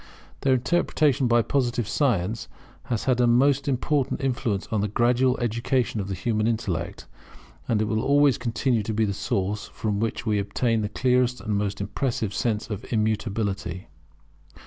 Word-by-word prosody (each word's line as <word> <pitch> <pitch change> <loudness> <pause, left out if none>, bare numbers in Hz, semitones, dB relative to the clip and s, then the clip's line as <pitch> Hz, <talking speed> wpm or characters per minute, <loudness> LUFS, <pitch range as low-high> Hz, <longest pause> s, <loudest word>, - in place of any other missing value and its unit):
Their 135 -1 +3
interpretation 145 -1 +2
by 120 0 +4
Positive 120 -5 0
science 115 - 0 0.4
has 115 -3 -2
had 125 -2 +2
a 120 - +4
most 135 +4 +3
important 140 +1 0
influence 120 -6 -1
on 110 -2 +1
the 105 - 0
gradual 125 +4 +2
education 120 -1 0
of 95 - -5
the 95 - -3
human 110 +1 0
intellect: 95 -8 -2 0.6
and 110 -2 +1
it - - 0
will 110 +1 0
always 145 0 +4
continue 120 0 0
to 105 +1 -3
be 110 0 +2
the 100 - -1
source 100 +1 -2
from 105 -2 -3
which 115 +1 -2
we 105 -2 +1
obtain 110 +3 0
the 105 - -2
clearest 125 +2 +1
and 110 -2 -2
most 100 0 -1
impressive 110 0 -2
sense 110 +2 -1
of 105 - -4
Immutability. 105 -5 -1
115 Hz, 165 wpm, -25 LUFS, 105-125 Hz, 0.6 s, by